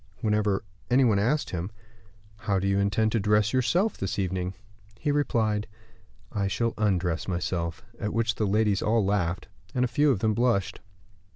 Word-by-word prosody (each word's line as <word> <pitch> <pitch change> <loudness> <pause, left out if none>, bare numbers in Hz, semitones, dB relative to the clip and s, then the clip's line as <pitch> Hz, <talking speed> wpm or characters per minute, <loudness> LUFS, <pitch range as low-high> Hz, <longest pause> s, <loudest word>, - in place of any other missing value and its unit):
Whenever 105 -2 +1 0.3
any 130 +2 +5
one 110 -5 +3
asked 130 +9 0
him, 90 +1 -3 0.7
"How 100 -2 -1
do 95 +1 0
you 100 0 +2
intend 100 +2 +1
to 115 - +1
dress 105 +2 +2
yourself 170 - +1
this 95 - -3
evening?" 95 -1 -2 0.4
he 150 +3 -1
replied, 110 -7 +1 0.6
"I 100 -2 -1
shall 115 +3 0
undress 90 -6 0
myself;" 85 -2 -2
at 105 - -2
which 115 0 +1
the 105 -1 -1
ladies 105 -1 +2
all 110 -1 +2
laughed, 95 -3 -1 0.3
and 125 0 +2
a - - 0
few 150 +4 +2
of 130 - +3
them 110 +2 +1
blushed. 105 -3 +1
105 Hz, 170 wpm, -27 LUFS, 95-115 Hz, 0.7 s, any